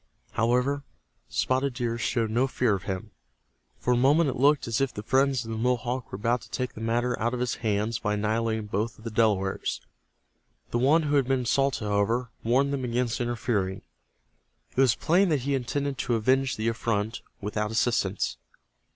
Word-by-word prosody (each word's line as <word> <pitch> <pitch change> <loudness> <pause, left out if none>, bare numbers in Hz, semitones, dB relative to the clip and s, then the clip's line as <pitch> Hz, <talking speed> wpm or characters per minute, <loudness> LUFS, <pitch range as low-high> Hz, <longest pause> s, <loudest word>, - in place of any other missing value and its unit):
However, 125 +5 +1 0.5
Spotted 130 - 0
Deer 120 -1 -2
showed 115 -2 0
no 125 +4 +2
fear 125 -4 +1
of 95 -1 -3
him. 100 +3 -4 0.7
For 125 - +1
a - - +3
moment 140 +4 +4
it - - -6
looked 145 +2 +3
as 115 +2 0
if 135 -2 +1
the 105 - -7
friends 130 0 +2
of 115 - -6
the 110 - -3
Mohawk 125 0 -1
were - - -4
about 115 +5 0
to - - -14
take 125 -1 -3
the 110 - -9
matter 120 +2 +1
out 120 +3 0
of - - -4
his 125 -1 -1
hands 110 +1 0
by 105 -1 0
annihilating 110 +1 0
both 105 +2 -2
of 110 - -16
the 115 - -5
Delawares. 105 -4 +1 0.9
The 120 - +1
one 150 +6 +4
who 145 -1 +2
had 135 -3 +2
been 135 -1 +2
insulted, 135 -1 +1
however, 110 +4 0
warned 135 +5 +2
them 135 -2 -2
against 120 0 -1
interfering. 110 -5 -1 0.9
It 130 - +3
was 125 -4 +4
plain 180 +4 +3
that 150 -5 +1
he 140 +3 -1
intended 135 +1 -2
to 120 - 0
avenge 130 +4 +2
the 110 +1 -2
affront 115 -1 -1 0.2
without 105 +1 -2
assistance. 110 -4 0
120 Hz, 185 wpm, -27 LUFS, 110-130 Hz, 0.9 s, moment